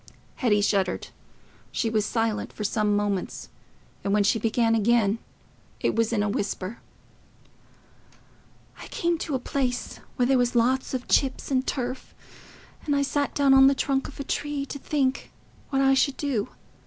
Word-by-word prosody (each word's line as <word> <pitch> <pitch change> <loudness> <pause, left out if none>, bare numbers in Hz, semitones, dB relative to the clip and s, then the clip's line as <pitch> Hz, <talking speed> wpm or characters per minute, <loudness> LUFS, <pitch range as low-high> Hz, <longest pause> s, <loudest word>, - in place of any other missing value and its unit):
Hetty 210 -6 +2
shuddered. 195 -3 0 0.6
She 230 - -1
was 215 -2 0
silent 225 -2 -1
for 210 - -6
some 210 0 +1
moments, 205 -2 -2 0.5
and 200 - -1
when 210 0 +4
she 220 +3 +2
began 225 +1 +2
again, 225 -1 +2 0.6
it - - 0
was 225 0 +1
in 210 -3 +1
a - - 0
whisper. 200 +1 -3 2.0
"I - - -9
came 340 -1 -1
to 295 - -2
a - - 0
place 245 -2 -2 0.2
where 245 - +2
there 265 0 +3
was 245 0 +1
lots 260 +3 +2
of 250 - -5
chips 270 0 +1
and 260 -1 +1
turf, 255 -1 -4 0.7
and 290 - 0
I 280 - +2
sat 285 0 -1
down 280 -2 +4
on 270 0 +8
the 275 - +4
trunk 270 0 0
of 285 - -12
a - - -2
tree 290 0 -2
to 280 - -7
think 275 -2 -1 0.4
what 270 -1 +1
I 270 0 +5
should 270 0 +2
do. 260 -8 -1
245 Hz, 165 wpm, -26 LUFS, 215-270 Hz, 2.0 s, on